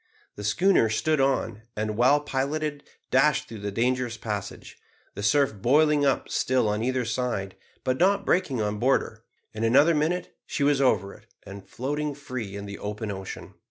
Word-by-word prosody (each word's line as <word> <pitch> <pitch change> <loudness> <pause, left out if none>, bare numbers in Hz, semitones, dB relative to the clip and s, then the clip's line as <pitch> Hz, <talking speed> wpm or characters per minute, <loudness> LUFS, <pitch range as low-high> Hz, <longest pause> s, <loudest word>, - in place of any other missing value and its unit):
The 105 - -8
schooner 170 - +3
stood 145 +7 +1
on, 120 -5 0
and, 110 0 -2
well 130 +6 +4
piloted, 145 +1 -2 0.3
dashed 135 +3 +3
through 115 - -9
the 100 0 -4
dangerous 120 +1 0
passage; 105 -3 -6 0.3
the 100 - -6
surf 135 +5 +3
boiling 145 +7 +3
up 135 - 0
still 130 -3 +1
on 105 +1 -1
either 130 0 0
side, 110 -4 -2 0.3
but 130 0 -1
not 200 +2 +3
breaking 145 - +1
on 105 0 -2
board 130 +4 +3
her. - - -11 0.3
In 110 - -4
another 140 +9 +5
minute 160 +4 -1
she 145 - -2
was 140 -1 +3
over 100 -7 +2
it, - - -18 0.2
and 95 0 -11
floating 145 +3 -3
free 125 -8 -6
in 100 0 -6
the 100 0 -8
open 105 +1 -4
ocean. 95 -1 -8
125 Hz, 175 wpm, -26 LUFS, 105-145 Hz, 0.3 s, another